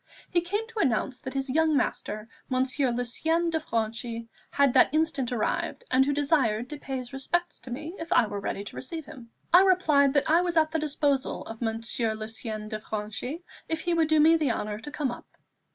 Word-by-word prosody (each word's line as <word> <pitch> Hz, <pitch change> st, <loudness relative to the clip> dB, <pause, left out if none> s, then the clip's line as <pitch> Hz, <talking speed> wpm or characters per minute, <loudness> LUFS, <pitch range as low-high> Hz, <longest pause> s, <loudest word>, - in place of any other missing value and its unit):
He 345 Hz, -, +3 dB
came 410 Hz, +6 st, -2 dB
to 460 Hz, -1 st, -6 dB
announce 255 Hz, -, +1 dB
that 260 Hz, -2 st, -7 dB
his 270 Hz, 0 st, 0 dB
young 315 Hz, +1 st, +3 dB
master, 215 Hz, -3 st, -2 dB, 0.2 s
Monsieur 260 Hz, +1 st, +1 dB
Lucien 320 Hz, +8 st, 0 dB
de 320 Hz, -, +1 dB
Franchi, 230 Hz, -3 st, -3 dB, 0.2 s
had 280 Hz, -3 st, +3 dB
that -, -, +6 dB
instant 310 Hz, -5 st, +1 dB
arrived, 245 Hz, -, -1 dB
and 260 Hz, +1 st, +5 dB
who 280 Hz, -, +1 dB
desired 275 Hz, -5 st, +1 dB
to 295 Hz, -, -6 dB
pay 270 Hz, -2 st, -4 dB
his 255 Hz, 0 st, -7 dB
respects 345 Hz, +6 st, -1 dB
to -, -, -12 dB
me 305 Hz, +7 st, -5 dB
if 330 Hz, +1 st, -7 dB
I 240 Hz, -, +5 dB
were 205 Hz, -1 st, -4 dB
ready 200 Hz, 0 st, -3 dB
to -, -, -9 dB
receive 320 Hz, +4 st, -5 dB
him. 240 Hz, -4 st, -12 dB, 0.2 s
I 355 Hz, -, +10 dB
replied 310 Hz, -8 st, +4 dB
that 285 Hz, -, +3 dB
I 330 Hz, +3 st, +5 dB
was 350 Hz, -2 st, -1 dB
at 315 Hz, -1 st, +4 dB
the 320 Hz, -, 0 dB
disposal 285 Hz, -2 st, 0 dB
of 225 Hz, +1 st, -9 dB
Monsieur 225 Hz, 0 st, -1 dB
Lucien 215 Hz, 0 st, -5 dB
de 215 Hz, 0 st, -4 dB
Franchi 220 Hz, -, -5 dB, 0.3 s
if 320 Hz, 0 st, -1 dB
he 345 Hz, -, 0 dB
would 325 Hz, -2 st, +3 dB
do 315 Hz, 0 st, +3 dB
me 320 Hz, +2 st, +7 dB
the 305 Hz, -6 st, +2 dB
honour 210 Hz, -1 st, -3 dB
to 260 Hz, -, -8 dB
come 290 Hz, -3 st, -2 dB
up. 240 Hz, -, -11 dB
270 Hz, 210 wpm, -27 LUFS, 230-320 Hz, 0.3 s, I